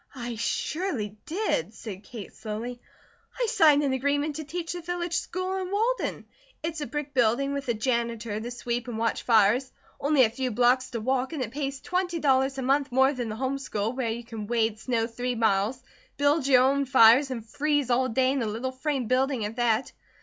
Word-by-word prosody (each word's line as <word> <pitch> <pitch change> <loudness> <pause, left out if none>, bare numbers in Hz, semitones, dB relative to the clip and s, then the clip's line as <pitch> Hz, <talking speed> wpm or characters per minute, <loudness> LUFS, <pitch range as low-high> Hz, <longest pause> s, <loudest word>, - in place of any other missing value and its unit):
"I 240 -2 -5
surely 235 - -2
did," 425 +8 -1
said 200 -3 -8
Kate 215 -2 -9
slowly. 225 +3 -6 0.6
"I - - +2
signed 305 -8 +5
an 275 -2 +1
agreement 285 +3 0
to 315 - -4
teach 335 +3 -4
the 350 - -6
village 345 0 -3
school 370 +2 -2
in 370 -1 -3
Walden. 450 +5 -1 0.4
It's 325 -1 -3
a 290 - -3
brick 295 -1 -4
building 255 +3 +2
with 280 -2 -4
a 235 - +2
janitor 235 -2 -1
to 235 - -5
sweep 240 0 -3
and 235 -2 -4
watch 230 0 0
fires, 230 +3 +3 0.3
only 285 -1 +4
a 220 - +2
few 255 +2 -2
blocks 250 +2 +2
to 235 - -4
walk, 260 +4 -1
and 285 -5 -2
it 225 - -6
pays 275 0 -4
twenty 360 -1 -1
dollars 270 -2 +2
a 265 - -2
month 275 +1 +1
more 265 +2 +4
than 245 -4 -4
the 215 - -4
home 265 +3 -2
school 220 -4 -2
where 255 -3 -2
you 235 +2 -4
can 225 -3 -7
wade 225 -2 0
snow 230 -1 0
three 245 +2 -3
miles, 220 +2 +1 0.3
build 285 0 +2
your 255 -2 +6
own 275 +1 +2
fires, 255 +1 +6
and 235 -4 -5
freeze 290 0 0
all 255 +1 +2
day 255 +2 +2
in 270 -1 0
a 225 - -1
little 230 +5 -3
frame 265 -1 -2
building 255 -1 +1
at 215 +3 -6
that. 240 0 +1
255 Hz, 205 wpm, -27 LUFS, 230-285 Hz, 0.6 s, your